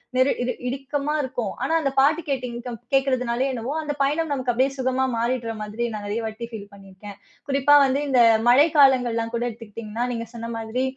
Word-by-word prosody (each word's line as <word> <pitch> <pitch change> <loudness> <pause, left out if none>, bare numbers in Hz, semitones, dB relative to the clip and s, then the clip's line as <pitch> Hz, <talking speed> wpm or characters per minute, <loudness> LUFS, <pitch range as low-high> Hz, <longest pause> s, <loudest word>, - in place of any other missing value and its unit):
நெரு 255 +2 +4
இரு 250 - -1
இறுக்கமா 280 +3 -3
இருக்கும். 245 -6 -3
ஆனா 325 - 0
அந்த 275 -4 -1
பாட்டு 300 +5 +4
கேட்டீங்க 250 -3 -3
கம் 240 -2 -5 0.2
கேட்கிறதுனாலேயோ 260 -1 +1
என்னவோ, 240 +3 -4
அந்த 300 -2 -3
பயணம் 300 +4 +1
நமக்கு 260 -3 0
அப்படியே 260 +3 +2
சுகமா 260 0 0
மாறிடுற 235 0 -1
மாதிரி 210 +3 -4
நான் 210 -1 -6
நிறைய 210 +3 -2
வாட்டி 220 +2 -5
ஃபீல் 205 -2 -8
பண்ணிருக்கேன். 195 +1 -12 0.3
குறிப்பா 275 +1 +3
வந்து 270 +1 +1
இந்த 260 -3 +2 0.3
மழை 275 +6 +6
காலங்கள்லாம் 245 -5 +4
கூட 235 - -1
எடுத்துக்கிட்டீங்கன்னா, 225 0 -6
நீங்க 230 -1 -4
சொன்ன 230 0 -6
மாதிரி 225 +3 -2
250 Hz, 180 wpm, -23 LUFS, 230-270 Hz, 0.3 s, மழை